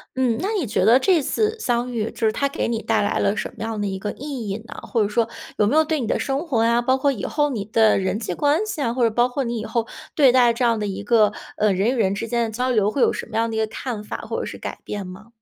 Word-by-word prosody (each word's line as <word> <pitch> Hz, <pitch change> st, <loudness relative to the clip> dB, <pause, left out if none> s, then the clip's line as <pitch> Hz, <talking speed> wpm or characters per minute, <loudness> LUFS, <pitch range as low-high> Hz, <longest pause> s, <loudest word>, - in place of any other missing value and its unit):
嗯， 250 Hz, -3 st, +1 dB
那 390 Hz, -, -1 dB
你 290 Hz, -, -2 dB
觉 200 Hz, -, 0 dB
得 230 Hz, +6 st, +6 dB
这 350 Hz, +2 st, +3 dB
次 430 Hz, +10 st, 0 dB
相 245 Hz, -, -1 dB
遇， 225 Hz, -2 st, -2 dB
就 225 Hz, -, 0 dB
是 -, -, +3 dB
它 280 Hz, +4 st, 0 dB
给 -, -, -2 dB
你 230 Hz, -1 st, -2 dB
带 -, -, +1 dB
来 205 Hz, -, 0 dB
了 200 Hz, +2 st, +1 dB
什 -, -, -2 dB
么 -, -, -6 dB
样 225 Hz, -1 st, -3 dB
的 205 Hz, -, -1 dB
一 190 Hz, -1 st, -3 dB
个 205 Hz, +2 st, -4 dB
意 265 Hz, -6 st, -6 dB
义 195 Hz, -, -2 dB
呢？ -, -, -9 dB
或 230 Hz, -, 0 dB
者 205 Hz, -, +2 dB
说 225 Hz, +2 st, 0 dB, 0.3 s
有 210 Hz, -, +3 dB
没 275 Hz, +9 st, +2 dB
有 315 Hz, -, +5 dB
对 310 Hz, -3 st, -1 dB
你 230 Hz, -, -2 dB
的 -, -, 0 dB
生 275 Hz, +4 st, -2 dB
活 230 Hz, -8 st, +1 dB
呀， 235 Hz, +1 st, +3 dB
包 260 Hz, +2 st, +2 dB
括 280 Hz, +2 st, +2 dB
以 205 Hz, -8 st, -7 dB
后 295 Hz, -1 st, 0 dB
你 215 Hz, -5 st, -2 dB
的 220 Hz, +1 st, +3 dB
人 190 Hz, +2 st, -1 dB
际 205 Hz, -6 st, -3 dB
关 295 Hz, -, +1 dB
系 340 Hz, -8 st, -4 dB
啊， 235 Hz, -4 st, 0 dB
或 250 Hz, 0 st, 0 dB
者 230 Hz, -, +4 dB
包 240 Hz, +3 st, +2 dB
括 265 Hz, +1 st, -2 dB
你 235 Hz, -1 st, -2 dB
以 -, -, -5 dB
后 230 Hz, 0 st, -1 dB, 0.3 s
对 270 Hz, -5 st, +5 dB
待 245 Hz, -2 st, +5 dB
这 240 Hz, +1 st, 0 dB
样 230 Hz, -1 st, +3 dB
的 210 Hz, -, -2 dB
一 200 Hz, -1 st, -4 dB
个 210 Hz, 0 st, +4 dB, 0.2 s
呃 210 Hz, -1 st, +2 dB
人 195 Hz, +5 st, +1 dB
与 -, -, 0 dB
人 210 Hz, -7 st, +1 dB
之 200 Hz, +3 st, -4 dB
间 235 Hz, 0 st, 0 dB
的 225 Hz, -, -3 dB
交 250 Hz, +3 st, -1 dB
流， 210 Hz, -4 st, +2 dB
会 265 Hz, -, -1 dB
有 -, -, +4 dB
什 -, -, -5 dB
么 -, -, -9 dB
样 230 Hz, 0 st, +1 dB
的 225 Hz, -, -4 dB
一 -, -, 0 dB
个 220 Hz, -, +2 dB
看 220 Hz, -1 st, -5 dB
法 -, -, -5 dB
或 -, -, -4 dB
者 -, -, -4 dB
是 -, -, -7 dB
改 -, -, -6 dB
变 205 Hz, -2 st, -5 dB
吗？ 185 Hz, +4 st, -11 dB
230 Hz, 340 characters per minute, -22 LUFS, 215-260 Hz, 0.3 s, 得